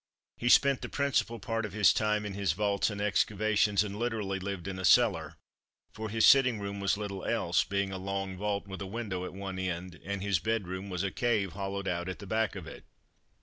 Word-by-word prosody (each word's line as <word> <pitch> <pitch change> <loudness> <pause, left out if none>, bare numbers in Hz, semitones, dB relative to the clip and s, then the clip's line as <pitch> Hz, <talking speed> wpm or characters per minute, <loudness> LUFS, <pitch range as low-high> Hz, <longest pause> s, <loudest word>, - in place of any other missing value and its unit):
He 120 - -1
spent 140 +1 +5
the - - -5
principal 140 -4 0
part 115 -2 -2
of 105 -3 -5
his 105 -2 +5
time 105 -1 0
in 105 - -4
his 100 -4 0
vaults 100 +3 +1
and 100 -1 -5
excavations, 105 0 +2
and 105 0 -6
literally 110 -5 -2
lived 95 -2 -5
in 95 -1 -4
a - - -5
cellar, 95 -5 +4 0.6
for 110 0 -6
his 110 +1 +3
sitting 130 -5 +6
room 100 0 -5
was 100 0 +1
little 100 -2 -5
else, - - +1
being 100 0 -1
a 95 - -4
long 95 0 -3
vault 100 +1 -2
with 95 0 -7
a 100 - -4
window 95 -4 -4
at - - -7
one 95 -1 -5
end, 90 -1 -4
and 100 +2 -4
his 100 -5 +1
bedroom 100 -3 -2
was 90 0 -2
a 100 - -1
cave 105 -4 0
hollowed 100 0 -4
out 85 +1 -2
at 95 - -5
the 100 - -10
back 110 +1 0
of 95 -5 -7
it. - - -10
100 Hz, 220 wpm, -30 LUFS, 95-110 Hz, 0.6 s, sitting